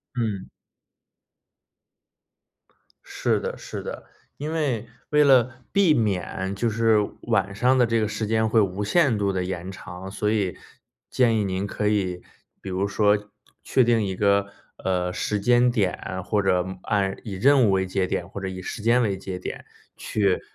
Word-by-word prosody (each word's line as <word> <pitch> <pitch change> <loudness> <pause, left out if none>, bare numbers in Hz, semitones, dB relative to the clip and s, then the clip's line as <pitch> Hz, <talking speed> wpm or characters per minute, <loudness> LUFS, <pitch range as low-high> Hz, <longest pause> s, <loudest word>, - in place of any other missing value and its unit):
嗯。 110 -6 -2 2.6
是 - - 0
的， - - -4
是 - - -7
的， - - -7 0.3
因 150 +3 -4
为 135 -9 -1 0.2
为 150 0 +5
了 130 -2 +4 0.2
避 195 -5 +4
免 95 - -1
就 115 +3 0
是 110 0 +3 0.2
晚 100 - 0
上 125 +6 +3
的 125 - +5
这 115 0 +1
个 110 - +1
时 110 +1 -3
间 110 +1 +1
会 110 0 +4
无 95 0 -1
限 140 -3 +3
度 100 -1 +1
地 90 -1 -1
延 90 0 -4
长， 95 +1 -9
所 105 +1 -1
以 100 -5 0 0.5
建 120 -3 +3
议 105 - +1
您 95 +1 -2
可 105 +1 -1
以 95 -4 -1 0.4
比 - - -8
如 95 +2 0
说 105 0 +3 0.5
确 130 - +3
定 115 -2 +3
一 95 -1 -2
个， 100 +1 +2 0.4
呃， 90 -1 0
时 105 +2 -2
间 120 +3 +4
点， 95 -4 -2
或 105 0 +1
者， 90 -2 +2
嗯， 95 0 -7
按 95 -2 0
以 100 -4 -5
任 130 +5 +4
务 100 - +3
为 95 0 +1
节 95 0 0
点， - - -3
或 100 - -7
者 95 - -4
以 95 0 -6
时 105 - -6
间 120 +3 +4
为 100 -4 0
节 95 -1 -6
点， 90 - -7 0.3
去 100 -3 0
105 Hz, 185 characters per minute, -24 LUFS, 95-115 Hz, 2.6 s, 为